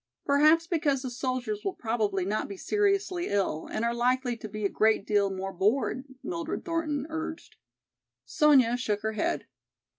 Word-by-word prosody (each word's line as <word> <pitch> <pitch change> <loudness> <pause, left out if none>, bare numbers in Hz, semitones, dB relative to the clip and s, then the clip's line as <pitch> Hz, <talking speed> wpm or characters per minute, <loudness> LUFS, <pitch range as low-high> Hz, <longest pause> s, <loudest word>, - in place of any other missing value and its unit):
Perhaps 305 +4 +5
because 300 -6 0
the 255 - -4
soldiers 255 - -3
will 390 -2 -2
probably 215 -5 -1
not 210 +3 -1
be 200 - -7
seriously 395 - 0
ill 190 -6 -1
and 230 - -1
are 235 - +1
likely 245 +1 +1
to 220 -1 -8
be 215 0 -4
a - - +5
great 215 0 +2
deal 205 -2 +2
more 195 0 -4
bored," 225 +7 0 0.2
Mildred 335 -2 -4
Thornton 310 -4 -1
urged. 320 0 -6 0.7
Sonya 265 -6 +4
shook 210 -5 -1
her 220 - -1
head. 210 - -1
255 Hz, 160 wpm, -28 LUFS, 215-320 Hz, 0.7 s, Perhaps